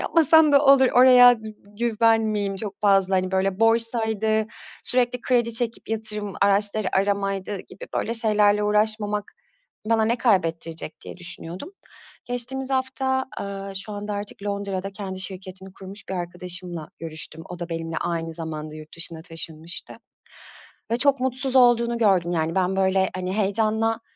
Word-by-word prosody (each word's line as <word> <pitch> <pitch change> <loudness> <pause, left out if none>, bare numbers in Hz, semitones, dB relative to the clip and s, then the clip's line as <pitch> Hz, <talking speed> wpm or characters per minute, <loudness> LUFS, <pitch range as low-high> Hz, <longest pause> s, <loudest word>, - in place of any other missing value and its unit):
yapmasam 320 -2 +4
da 280 +1 +5
olur. 275 -1 +7
Oraya 245 -1 +8
dü 215 - -6 0.3
güven 230 -1 +3
miyim 205 -3 -1
çok 200 -1 -7
fazla, 195 -2 +3
hani, 185 0 0
böyle, 190 +1 0
borsaydı, 220 -1 +1 0.4
sürekli 250 -1 +1
kredi 235 -2 +1
çekip 230 -1 -2
yatırım 215 -3 -3
araçları 200 0 +3
aramaydı 195 0 -1
gibi 185 - -12
böyle 230 - -1
şeylerle 210 -2 +3
uğraşmamak 210 0 0 0.6
bana 225 -1 +3
ne 235 +2 +1
kaybettirecek 165 -8 -1
diye - - -10
düşünüyordum. 175 - -8 0.5
Geçtiğimiz 255 +2 -3
hafta, 265 0 -1
aaa, 195 0 -6
şu 195 +2 -5
anda 205 +1 -5
artık 205 0 -7
Londra'da 200 -1 -3
kendi 190 -2 -6
şirketini 190 0 -7
kurmuş 195 +2 -10
bir 190 - -3
arkadaşımla 175 -2 -5
görüştüm, 160 0 -3
o 180 - -8
da 170 0 -5
benimle 165 -1 -4
aynı 165 -1 -3
zamanda 155 -2 -5
yurt 155 0 -11
dışına 165 -1 +1
taşınmıştı. 165 0 -4 1.0
Ve 230 - +2
çok 275 -1 +3
mutsuz 260 +1 -1
olduğunu 235 -1 +4
gördüm, 185 -6 +2
yani, 165 -1 -1
ben, 190 +1 +1
böyle, 190 0 +2
hani, 185 0 -3
heyecanla, 220 +2 +1
205 Hz, 145 wpm, -24 LUFS, 185-230 Hz, 1.0 s, Oraya